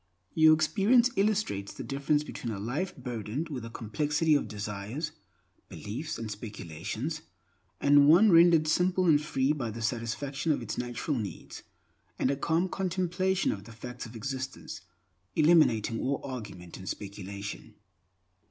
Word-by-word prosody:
Your 155 0 +7
experience 215 +10 +3
illustrates 195 - 0
the - - -6
difference 145 +2 0
between 120 -5 -5
a 105 - -4
life 135 - -3
burdened 125 +4 -4
with 130 -6 -5
a 115 - -6
complexity 150 +8 0
of 145 - +2
desires, 105 +8 -4 0.6
beliefs, 130 +10 -5
and 110 -2 -5
speculations, 105 - -5 0.6
and 145 0 +6
one 190 +7 +7
rendered 165 -2 +6
simple 180 +3 +2
and 150 -4 +5
free 135 -2 +1
by 130 -6 -3
the 115 +2 -6
satisfaction 125 +6 -2
of 140 - 0
its 110 - -4
natural 125 +3 -2
needs, 100 -7 -7 0.6
and 130 - +1
a - - 0
calm 165 +6 +1
contemplation 185 0 0
of 100 -1 -6
the 115 - -11
facts 125 +2 -8
of 115 - -12
existence, 130 -3 -5 0.5
eliminating 150 -9 +4
all 140 +1 -1
argument 105 -9 -7
and 95 -1 -7
speculation. 100 0 -7
135 Hz, 145 wpm, -29 LUFS, 110-160 Hz, 0.6 s, Your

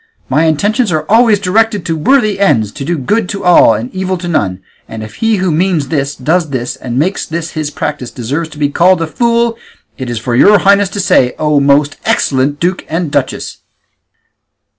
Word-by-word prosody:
My 150 +5 +2
intentions 205 - +1
are 155 -1 -1
always 225 0 +4
directed 210 +1 0
to 165 - -1
worthy 215 - +1
ends, 120 - +2
to 140 - -7
do 170 +4 -2
good 200 - -1
to 200 - -5
all 175 -9 +5
and 115 +4 -6
evil 185 0 -2
to 175 0 -6
none; 100 - -1 0.3
and 110 -1 -7
if 110 0 -11
he 225 -1 +1
who 185 -2 0
means 160 -3 0
this, 140 -2 -2
does 160 +4 0
this, 125 -3 -3
and 125 -1 -5
makes 180 +8 0
this 165 0 -4
his 155 -2 -3
practice 145 -4 -4
deserves 140 +7 -4
to 150 - -13
be 145 -1 0
called 175 +3 +3
a - - -1
fool, 235 +5 0 0.4
it 130 -2 -5
is 120 - -3
for 120 +2 -2
your 205 +11 +6
highnesses 200 0 +2
to 205 - -4
say, 125 -8 +2
O 150 -1 +1
most 140 +1 +2
excellent 140 +2 0
duke 180 +2 -1
and 165 -1 -2
duchess." - - -2
160 Hz, 200 wpm, -13 LUFS, 140-195 Hz, 0.4 s, your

